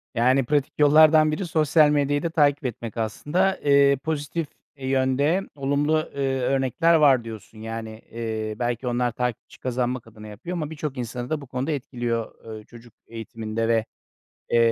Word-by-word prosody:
Yani, 130 Hz, +3 st, +3 dB
pratik 145 Hz, 0 st, 0 dB
yollardan 155 Hz, +1 st, +6 dB
biri 180 Hz, +5 st, -2 dB
sosyal 155 Hz, -1 st, +4 dB
medyayı 145 Hz, 0 st, +1 dB
da 170 Hz, -, 0 dB
takip 145 Hz, -3 st, +2 dB
etmek 115 Hz, -1 st, -5 dB
aslında. 165 Hz, -, 0 dB
Eee, 140 Hz, -1 st, +5 dB
pozitif 155 Hz, 0 st, -2 dB, 0.3 s
yönde 135 Hz, +5 st, +1 dB
olumlu, 145 Hz, +3 st, 0 dB
eee, 135 Hz, -1 st, 0 dB
örnekler 135 Hz, +6 st, +2 dB
var 135 Hz, -6 st, +5 dB
diyorsun. 110 Hz, -1 st, -10 dB
Yani, 110 Hz, 0 st, -6 dB
eee, 110 Hz, -2 st, -4 dB
belki 120 Hz, +1 st, -2 dB
onlar 120 Hz, 0 st, 0 dB
takipçi 125 Hz, -1 st, -4 dB
kazanmak 125 Hz, -1 st, -2 dB
adına 110 Hz, -1 st, -12 dB
yapıyor 170 Hz, -, -6 dB
ama 155 Hz, -2 st, -3 dB
birçok 150 Hz, -3 st, -5 dB
insanı 120 Hz, 0 st, -5 dB
da 155 Hz, -2 st, -2 dB
bu 140 Hz, -, -11 dB
konuda 130 Hz, +5 st, -3 dB
etkiliyor, 120 Hz, -4 st, -4 dB
eee, 110 Hz, -, -11 dB
çocuk 120 Hz, -1 st, -15 dB
eğitiminde 115 Hz, 0 st, -4 dB
ve, 115 Hz, -1 st, +2 dB, 0.6 s
eee, 120 Hz, -, +2 dB
130 Hz, 155 wpm, -24 LUFS, 115-150 Hz, 0.6 s, yollardan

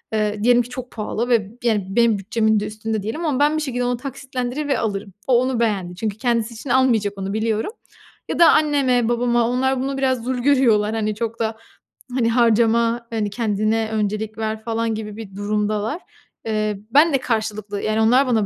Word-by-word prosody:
ııı, 210 Hz, -1 st, -1 dB
diyelim 245 Hz, +1 st, +5 dB
ki 240 Hz, -, -7 dB
çok 250 Hz, 0 st, -7 dB
pahalı 225 Hz, +2 st, -3 dB
ve, 215 Hz, -5 st, +2 dB
yani, 215 Hz, -5 st, +1 dB
benim 230 Hz, +1 st, +3 dB
bütçemin 220 Hz, +2 st, +1 dB
de 205 Hz, -, -3 dB
üstünde 215 Hz, 0 st, -4 dB
diyelim 305 Hz, +11 st, -3 dB
ama 285 Hz, -4 st, 0 dB
ben 295 Hz, +2 st, +3 dB
bir -, -, -1 dB
şekilde 250 Hz, -4 st, -2 dB
onu 245 Hz, 0 st, 0 dB
taksitlendirir 260 Hz, +1 st, -4 dB
ve 275 Hz, -, +1 dB
alırım. 200 Hz, -3 st, -3 dB
O 245 Hz, -2 st, +5 dB
onu 255 Hz, -2 st, -1 dB
beğendi, 195 Hz, -6 st, -1 dB
çünkü 210 Hz, +2 st, -3 dB
kendisi 235 Hz, -1 st, 0 dB
için 235 Hz, +4 st, -9 dB
almayacak 235 Hz, -6 st, +2 dB
onu 195 Hz, 0 st, -4 dB
biliyorum 220 Hz, -, -1 dB, 0.6 s
ya -, -, -2 dB
da 335 Hz, -1 st, +8 dB
anneme, 270 Hz, -6 st, +2 dB
babama, 240 Hz, -1 st, +2 dB
onlar 260 Hz, +1 st, +1 dB
bunu, 270 Hz, 0 st, -2 dB
biraz 260 Hz, -3 st, 0 dB
zül 255 Hz, +1 st, -2 dB
görüyorlar. 240 Hz, -6 st, +3 dB
Hani, 215 Hz, -1 st, -1 dB
çok 230 Hz, +1 st, -4 dB
da, 220 Hz, -1 st, -1 dB, 0.6 s
hani, 235 Hz, -3 st, +2 dB
harcama, 235 Hz, 0 st, +2 dB
hani, 220 Hz, -3 st, -1 dB
kendine 215 Hz, 0 st, 0 dB
öncelik 215 Hz, 0 st, -2 dB
ver 220 Hz, 0 st, -3 dB
falan 225 Hz, -1 st, -1 dB
gibi 210 Hz, -1 st, -6 dB
bir 195 Hz, -4 st, -9 dB
durumdalar. 210 Hz, -, -1 dB, 0.4 s
Eee, 215 Hz, -2 st, -1 dB
ben 300 Hz, +4 st, +5 dB
de -, -, +5 dB
karşılıklı, 215 Hz, -4 st, -3 dB
yani, 215 Hz, +1 st, 0 dB
onlar 250 Hz, +5 st, +4 dB
bana 225 Hz, -4 st, +2 dB
225 Hz, 190 wpm, -21 LUFS, 215-250 Hz, 0.6 s, da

